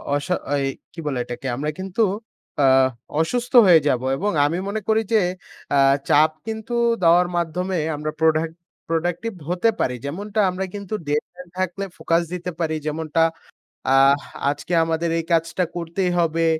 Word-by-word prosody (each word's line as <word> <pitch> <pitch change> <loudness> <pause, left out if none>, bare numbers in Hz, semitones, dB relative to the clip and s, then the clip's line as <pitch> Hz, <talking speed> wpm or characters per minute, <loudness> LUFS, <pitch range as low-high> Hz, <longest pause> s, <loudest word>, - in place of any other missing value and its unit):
অসা 145 +5 0 0.3
এই - - 0 0.3
কি 165 - -10
বলে 140 -3 -1
এটাকে? 120 +2 -6
আমরা 145 +4 -2
কিন্তু 190 +3 -2 0.6
আ - - +4 0.6
অসুস্থ 240 +10 -1
হয়ে 170 -3 +8
যাবো। 130 -2 +1
এবং 205 +5 0
আমি 160 +4 0
মনে 215 +2 -2
করি 220 0 +3
যে, 220 - +6 0.6
আ - - +4 0.3
চাপ 155 +2 +5 0.2
কিন্তু 220 +1 -5 0.3
দেওয়ার 175 +2 +5
মাধ্যমে 180 +3 -1 0.2
আমরা 150 +1 -3
প্রোডা 160 -1 +3 0.5
প্রোডাক্টিভ 175 +7 -1 0.2
হতে 180 +6 +2
পারি। 125 - 0
যেমনটা 200 +9 -4
আমরা 185 +1 -3
কিন্তু 200 0 -6
ডেডলাইন 175 +5 -3
থাকলে 185 +1 -2
ফোকাস 165 +1 +1
দিতে 180 0 -4
পারি। 160 -2 0
যেমনটা 155 +1 -1 0.7
আ - - +5 0.6
আজকে 145 +5 -5
আমাদের 165 +1 -1
এই 165 - -2
কাজটা 165 +2 +1
করতেই 175 +2 -1
হবে 165 0 +2
170 Hz, 150 wpm, -22 LUFS, 155-185 Hz, 0.7 s, হয়ে